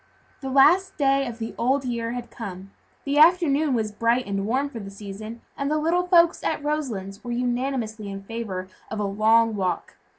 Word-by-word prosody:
The 270 - -5
last 315 +8 +4
day 275 -2 +2
of 235 -1 -6
the 225 -1 -5
old 265 +3 +1
year 235 -1 -2
had 245 -1 -6
come; 195 -3 -8 0.3
the 285 +1 +1
afternoon 310 -4 +4
was 220 -2 -1
bright 230 +4 +1
and 195 0 -2
warm 265 +5 +1
for 245 -5 -8
the 200 -2 -7
season, 210 +3 -8
and 280 0 -2
the 305 - +1
little 340 +4 +1
folks 340 -2 +4
at 310 -2 -1
Roselands 235 -11 -3
were 240 - -7
unanimously 240 -3 -2
in 195 0 -7
favor 195 -4 -5 0.2
of 215 - -4
a - - 0
long 220 +3 +3
walk. 185 -4 -2
235 Hz, 190 wpm, -24 LUFS, 210-280 Hz, 0.3 s, last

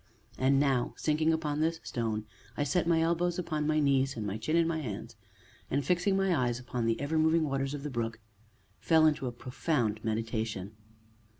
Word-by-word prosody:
And 135 +1 +4
now, 135 -4 +1
sinking 155 +1 +2
upon 155 -2 -1
this 165 +1 +1
stone, 110 -3 -2 0.3
I 145 - +1
set 165 +5 +1
my 165 -1 +3
elbows 170 +1 +1
upon 155 -4 -2
my 155 0 +2
knees, 135 -2 +2
and 110 - -3
my 100 0 -2
chin 155 +9 -1
in 170 -1 +4
my 165 -1 -1
hands, 115 -3 -6 0.5
and, 140 0 0
fixing 180 +4 +2
my 195 -2 +2
eyes 120 -4 0
upon 125 -2 -3
the 115 - +1
ever 155 +3 0
moving 160 +1 +3
waters 135 -1 -1
of 140 - -7
the 150 - -4
brook, 115 -2 -3 0.6
fell 160 -1 +4
into 150 -4 +2
a - - -2
profound 120 -3 -2
meditation. 110 -3 -2
140 Hz, 190 wpm, -30 LUFS, 120-160 Hz, 0.6 s, And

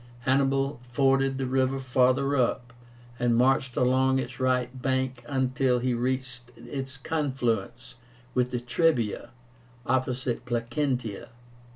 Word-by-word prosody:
Hannibal 135 +1 +1
forded 135 +2 +1
the 135 - -1
river 130 +1 +1
farther 130 +1 +2
up, 120 -2 0 0.5
and 120 -1 +2
marched 130 +1 +2
along 130 +1 +3
its 130 +1 -4
right 130 0 0
bank 130 -1 -1
until 130 -1 +1
he 125 +1 0
reached 125 0 -2
its 135 +3 -6
confluence 130 -5 -2 0.4
with 125 -1 +1
the 125 -1 -2
Trebia, 120 -1 0 0.6
opposite 130 -1 -1
Placentia. 120 -1 -2
130 Hz, 110 wpm, -27 LUFS, 125-135 Hz, 0.6 s, along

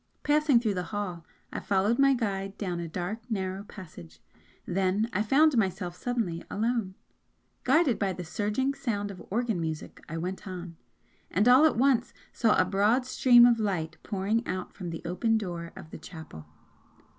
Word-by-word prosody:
Passing 295 -3 +4
through 220 -3 0
the 180 -1 -3
hall, 195 -5 -4 0.3
I - - -2
followed 205 +4 +1
my 275 0 +5
guide 195 -4 -3
down 180 -4 -3
a 170 - -4
dark 180 +6 -4
narrow 190 -3 -2
passage 85 - -12 0.5
then 190 +4 +1
I 205 - +1
found 280 +7 +4
myself 190 -5 -1
suddenly 225 -8 -2
alone. 225 -3 -1 0.7
Guided 275 -1 +3
by 195 -2 0
the 180 - -6
surging 210 +10 -1
sound 215 -7 -3
of 185 - -10
organ 225 -3 -1
music, 160 -1 -5
I 165 - -4
went 185 +4 -5
on, 180 -2 -7 0.5
and 200 +6 +2
all 255 +5 +7
at 310 - +3
once 250 -2 +2 0.2
saw 225 -3 +3
a 185 - +4
broad 205 +7 +2
stream 245 -2 +6
of 235 -1 +4
light 185 -7 -2
pouring 205 +3 -1
out 185 -1 -4
from 180 -3 -6
the 165 -1 -6
open 225 +6 +1
door 170 -5 -5
of 155 - -11
the - - -8
chapel. 155 - -11
200 Hz, 170 wpm, -28 LUFS, 180-235 Hz, 0.7 s, all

